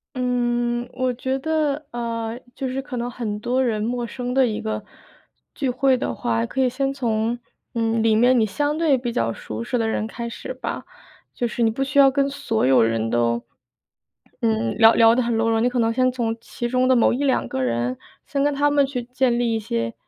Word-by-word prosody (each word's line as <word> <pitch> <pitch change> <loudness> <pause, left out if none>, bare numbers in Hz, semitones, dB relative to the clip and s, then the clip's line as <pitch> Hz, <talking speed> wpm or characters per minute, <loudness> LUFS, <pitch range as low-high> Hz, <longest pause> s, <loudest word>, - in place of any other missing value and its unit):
嗯， 240 -1 0
我 255 0 0
觉 260 +2 -2
得， 305 0 -1
呃， 230 -1 -3 0.2
就 270 - -3
是 260 +1 -3
可 265 -2 -7
能 240 +1 -2
很 220 -4 -4
多 250 +4 0
人 220 -4 0
陌 240 +1 -2
生 245 +1 -4
的 265 -1 +4
一 215 -1 -2
个 220 -1 -3 0.7
聚 275 -3 -2
会 260 +1 +3
的 180 - -3
话， 115 0 0
可 265 - -5
以 260 - +4
先 270 +2 -1
从， 230 -3 -1 0.4
嗯， 225 0 +1
里 220 -1 +3
面 245 +3 +4
你 - - +4
相 290 +8 -1
对 315 -5 +3
比 245 -1 -3
较 115 - 0
熟 110 0 -6
识 245 - -1
的 225 -1 0
人 220 -1 -1
开 235 +1 -6
始 235 - -7
吧， 255 - -5 0.5
就 240 - -1
是 235 - -4
你 225 - +4
不 240 +5 -2
需 275 +1 +1
要 275 -1 +8
跟 275 0 +1
所 240 -5 -1
有 130 0 +5
人 115 0 +1
都， 120 0 +1 1.0
嗯， 110 0 0
聊 225 +1 +8
聊 230 0 +6
得 250 - +2
很 235 -2 0
多 225 0 +2
了， 225 0 +2
你 245 - +3
可 250 - -3
能 230 -1 +2
先 255 +1 +2
从 235 -3 -2
其 240 - -5
中 255 +1 +1
的 260 - +5
某 235 - +4
1-2 270 +1 +1
个 130 - -3
人， 120 0 0 0.3
先 280 -1 -1
跟 290 0 +2
他 290 +1 +2
们 285 -1 +4
去 255 -3 -4
建 250 0 0
立 235 -1 +1
一 - - 0
些 115 - -2
240 Hz, 235 characters per minute, -22 LUFS, 225-260 Hz, 1.0 s, 要